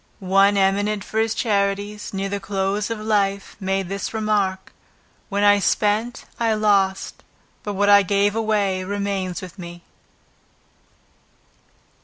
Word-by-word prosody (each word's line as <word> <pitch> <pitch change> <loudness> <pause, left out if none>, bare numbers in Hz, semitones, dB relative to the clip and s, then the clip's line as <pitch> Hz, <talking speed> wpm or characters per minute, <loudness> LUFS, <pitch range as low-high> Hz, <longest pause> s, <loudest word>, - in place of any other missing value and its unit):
One 200 +1 +5
eminent 200 +1 +1
for 220 - -3
his 225 0 0
charities, 205 -1 -1
near 195 0 -3
the 200 +1 -3
close 200 +1 -2
of 230 -1 -3
life, 200 -2 -1
made 195 -1 -1
this 200 +4 -4
remark: 205 -3 -1 0.6
"What 200 -1 0
I 205 0 +5
spent 215 +5 0
I 225 -2 +2
lost, 200 -3 +1 0.4
but 205 - -4
what 205 +1 +1
I 200 0 +7
gave 200 +2 +1
away 205 -4 0
remains 195 -2 -3
with 185 +2 -10
me." 175 -1 -9
200 Hz, 130 wpm, -22 LUFS, 195-210 Hz, 0.6 s, I